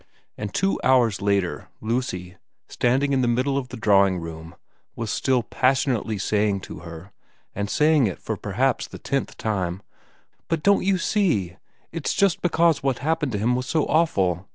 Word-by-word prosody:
And 105 -2 -5
two 195 - 0
hours 120 -6 +3
later 100 -8 0
Lucy, 110 -6 -3 0.3
standing 135 +3 +1
in 130 - +2
the 125 - +1
middle 130 +4 +1
of 135 -2 -2
the 125 - -8
drawing 100 -3 +4
room, 80 0 -8 0.4
was 115 -2 -3
still 130 -3 +1
passionately 130 -4 0
saying 105 0 0
to - - -9
her, 85 +2 -10 0.4
and 100 0 -3
saying 150 -3 +3
it 95 - -4
for - - -4
perhaps - - -1
the - - -10
tenth - - -3
time, 95 -3 -2 0.3
' - - -40
But 165 -2 -1
don't 200 0 +4
you 190 0 +2
see? 135 - 0 0.3
It's 165 -3 -2
just 200 -3 +2
because 170 -3 +2
what 135 -2 0
happened 150 -1 -1
to - - 0
him 115 +5 +1
was 125 0 -3
so 155 +1 +1
awful. 95 - +1
120 Hz, 175 wpm, -24 LUFS, 100-140 Hz, 0.4 s, drawing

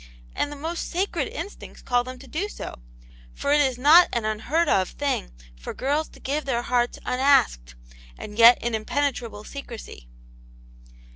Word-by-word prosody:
And 290 - -1
the - - -6
most 325 +4 -4
sacred 350 -5 -1
instincts 345 +6 -8
call 245 -1 +1
them 255 +1 -8
to 265 - -14
do 340 +11 -3
so; - - -7 0.6
for 280 - -2
it 295 - +5
is 260 -3 +1
not 310 +7 +7
an 235 -2 -1
unheard 235 +11 0
of 190 -9 +2
thing 280 - -2 0.3
for - - -8
girls 290 +4 -1
to - - -17
give 290 +3 -2
their 240 -3 -1
hearts 245 0 0
unasked, 155 - +2 0.4
and 210 - -9
yet 235 +2 +8
in 235 0 -1
impenetrable 230 -1 -2
secrecy." 230 - -9
260 Hz, 160 wpm, -24 LUFS, 230-295 Hz, 0.6 s, yet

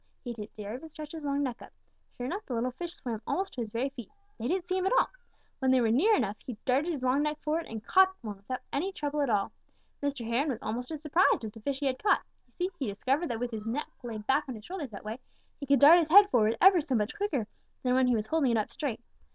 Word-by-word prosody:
He 245 -3 -4
didn't 215 -2 -9
dare 210 0 -6
even 275 +6 -8
stretch 305 -1 -9
his 320 - -7
long 285 0 0
neck 245 -3 -3
up. - - -12 0.5
Sure 245 - -4
enough, 390 +11 -3
the 255 - -3
little 245 +2 0
fish 345 +7 -6
swam 230 -4 -5
almost 385 +1 -1
to 250 - -4
his 225 - -4
very 235 +6 -1
feet. 260 -4 -10 0.3
They 230 - -2
didn't 360 +2 -1
see 370 - 0
him 375 0 +1
at - - +2
all. - - +4 0.5
When 265 - +1
they 260 0 +5
were 230 -2 +2
near 390 - +4
enough, 210 - -1
he 245 -4 -7
darted 275 +6 +2
his 285 -6 -4
long 260 +3 +3
neck 300 0 -1
forward 315 +2 -1
and 220 -1 -7
caught 380 0 +5
one 210 -4 -6
without 250 +6 -5
any 355 +8 0
trouble 295 -4 -2
at 280 - +1
all. 205 -3 +1 0.5
Mr. 280 -4 -2
Heron 255 +6 +1
was 255 - -1
almost 245 +3 -3
as 310 -1 -6
surprised 330 -2 +3
as 215 - -5
the 225 - -13
fish 275 +4 -3
he - - 0
had 260 -1 -1
caught. 410 - +3 0.2
You - - -33 0.2
see, - - -40
he 270 - -1
discovered 265 - 0
that 230 -5 -3
with 245 0 -2
his 220 -1 -5
neck 260 +7 -3
laid 220 -4 -6
back 280 +4 +2
on 255 - -4
his 215 0 -11
shoulders 345 -7 -5
that 205 -1 -10
way, 220 +3 -5 0.4
he 280 - -6
could 280 -1 +4
dart 310 +6 +9
his 320 -2 0
head 405 +4 +8
forward 225 -2 +3
ever 375 -2 +7
so 285 -4 -1
much 210 0 0
quicker 400 - -1 0.4
than 250 -1 +2
when 260 0 +4
he 245 - +3
was 215 -1 -1
holding 300 +1 +1
it 230 - +2
up 215 - -1
straight. 245 -6 -3
265 Hz, 280 wpm, -30 LUFS, 230-310 Hz, 0.5 s, dart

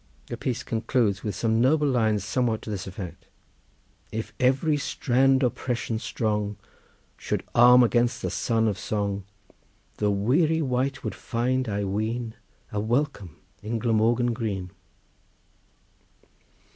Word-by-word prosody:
The - - -5
piece 125 0 -3
concludes 115 -2 0
with 105 - -3
some 115 0 +1
noble 150 +4 +3
lines 110 -6 +2
somewhat 110 +2 0
to 110 - -6
this 100 -3 -4
effect:— 95 -2 -8 0.8
"If 110 0 -5
every 135 +4 +3
strand 135 -1 +2
oppression 120 -2 -1
strong 105 -3 -2 0.6
Should - - -2
arm 125 +1 +8
against 120 0 +1
the - - -1
son 115 -1 +1
of 100 -3 -1
song, 100 -2 -2 0.7
The 105 - +1
weary 140 - +2
wight 135 +1 -1
would - - -3
find, 130 +1 -1
I 100 0 -1
ween, 110 +4 -2 0.4
A 105 - -2
welcome 110 - -1 0.2
in 110 +3 -2
Glamorgan 115 +2 +2
green." 100 -6 -3
115 Hz, 125 wpm, -26 LUFS, 105-125 Hz, 0.8 s, arm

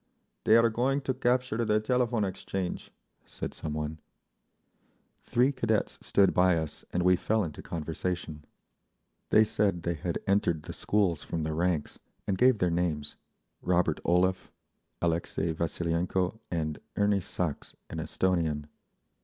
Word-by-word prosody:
"They 110 - +7
are 115 0 +4
going 135 +5 +1
to 135 - -1
capture 125 -2 +1
the 105 -1 +2
Telephone 120 -1 +1
Exchange," 95 -1 -4 0.3
said - - -6
some 75 - -4
one. 75 +1 -4 1.3
Three 125 +3 +3
cadets 115 -5 -1
stood 100 -1 +3
by 90 -1 +4
us, 80 -2 -4
and 90 - 0
we 90 0 +5
fell 110 +4 +1
into 80 -4 -6
conversation. 80 -1 -4 0.9
They 110 - +6
said 100 -5 +1
they 85 - 0
had 85 +1 -3
entered 95 -5 +1
the - - -7
schools 95 -7 +1
from 80 -2 -3
the 80 0 -2
ranks, 85 -2 -1 0.3
and 100 - 0
gave 125 +3 +5
their 90 -3 +1
names—Robert 85 0 -2
Olev, 90 +1 +2 0.5
Alexei 85 0 0
Vasilienko 85 +4 -1
and 80 -3 -2 0.2
Erni 100 -1 +2
Sachs, 85 -3 -3
an - - -6
Esthonian. 80 -5 0
90 Hz, 135 wpm, -29 LUFS, 80-105 Hz, 1.3 s, They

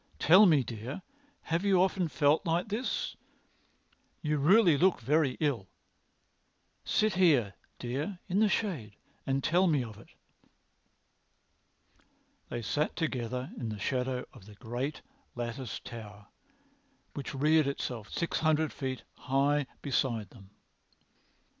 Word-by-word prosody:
Tell 190 +6 +7
me, 150 -6 +4
dear, 120 - -6 0.4
have 165 +3 -1
you 195 -3 +4
often 185 -1 +2
felt 145 +2 +2
like 170 +5 0
this? 225 +5 -2 1.1
You 150 -1 0
really 175 +3 +6
look 180 +5 +3
very 135 +2 +1
ill. 135 -11 0 1.2
Sit 215 0 +1
here, 145 - +3 0.2
dear, 140 +10 -3
in 185 +3 +1
the 215 -1 +4
shade 150 - -2 0.3
and 135 0 0
tell 180 +4 +3
me 150 -6 +2
of 110 -3 -9
it." - - -15 2.4
They 120 -1 -4
sat 150 +7 -1
together 125 -5 -3
in 115 -3 -3
the 105 - -5
shadow 125 +3 -1
of 95 - -15
the 105 - -13
great 125 +6 -4 0.3
latticed 120 0 -5
Tower 105 -3 -10 0.8
which 140 0 -6
reared 155 +2 +3
itself 120 -6 -4
six 170 - -2
hundred 155 -1 +2
feet 130 -2 -4
high 140 +1 +1 0.2
beside 120 -7 -1
them. 100 -5 -15
140 Hz, 125 wpm, -30 LUFS, 120-165 Hz, 2.4 s, Tell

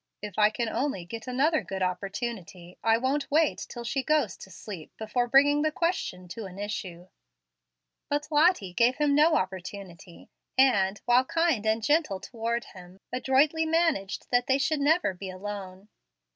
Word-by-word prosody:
If 210 -1 -6
I 210 0 +6
can 235 +2 -3
only 245 -6 -2
get 225 +7 -8
another 285 +6 +2
good 190 -1 -4
opportunity, 185 -1 -4
I 225 0 +4
won't 270 +4 -1
wait 310 +1 +1
till 240 - -7
she 265 +3 -1
goes 285 - +1
to - - -12
sleep 185 -2 -9
before 240 +3 -1
bringing 285 +3 +5
the 310 0 +1
question 305 - -2
to 225 +4 -6
an 185 0 -12
issue." 185 -4 -5 1.0
But 290 +1 -1
Lottie 300 - +3
gave 240 +5 +3
him 295 0 +2
no 305 +3 +5
opportunity, 185 -2 -6 0.3
and, 205 -7 +4
while 245 +2 +4
kind 325 -9 +1
and 220 +1 +1
gentle 295 - +1
toward 235 +2 -3
him, 180 0 -14 0.2
adroitly 285 +5 +2
managed 320 - 0
that 245 0 +2
they 265 - +3
should 300 +2 0
never 295 - +2
be 190 +1 -8
alone. 190 0 -7
235 Hz, 160 wpm, -27 LUFS, 190-285 Hz, 1.0 s, I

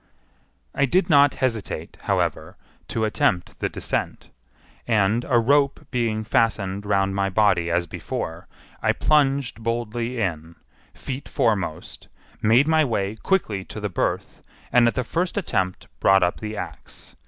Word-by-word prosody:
I - - +2
did 180 +5 +2
not 145 -1 +6
hesitate, 115 -6 -3
however, - - -1 0.3
to 110 -1 -1
attempt 90 -4 0
the - - -1
descent; - - -3 0.6
and 110 +1 +2
a 125 - +4
rope 140 +4 +2
being 115 -3 0
fastened 100 -3 0
round 95 -1 +1
my 100 0 0
body 95 -4 +2
as 85 +1 +1
before, 80 0 -5 0.3
I - - +2
plunged 140 -5 +1
boldly 115 +1 -2
in, 85 -5 -3 0.4
feet 135 +1 -6
foremost, 95 -8 -1 0.3
made 120 +7 +4
my 160 -1 +4
way 110 -6 -1
quickly 110 - 0
to - - -8
the 105 -1 -3
berth, 90 - -2 0.3
and 120 -1 +5
at 115 - 0
the 130 - 0
first 175 - -2
attempt 95 - -1
brought 95 0 +5
up 90 - 0
the 110 0 -5
axe. - - -9
110 Hz, 140 wpm, -23 LUFS, 95-130 Hz, 0.6 s, not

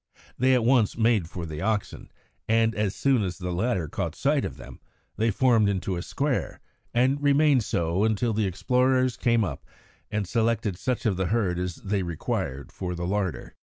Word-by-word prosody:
They 130 +1 +3
at 120 -3 +1
once 120 -4 +3
made 110 -7 +2
for 85 -1 -6
the 80 -1 -6
oxen, 105 +1 -2 0.4
and, 115 0 +3
as 105 -2 -1
soon 135 -4 +2
as 90 -4 -3
the 90 -1 -4
latter 90 -2 0
caught - - -3
sight - - +1
of - - -5
them, - - -11 0.4
they 115 +1 +1
formed 115 -2 +3
into 95 -1 -2
a 85 - -3
square 140 +7 -2 0.3
and 130 +4 +2
remained 145 -3 +4
so 85 0 0
until 110 +1 +1
the 105 -1 +1
explorers 125 +7 +1
came 115 -2 +2
up 95 - -4 0.5
and 105 -3 -2
selected 115 -2 0
such 125 +6 -2
of 100 -5 +1
the 95 -1 0
herd 95 -4 0
as 90 -2 -3
they 100 0 -2
required 75 -5 -3
for 90 -2 -4
the 85 0 -4
larder. 95 -1 -2
105 Hz, 185 wpm, -26 LUFS, 90-120 Hz, 0.5 s, remained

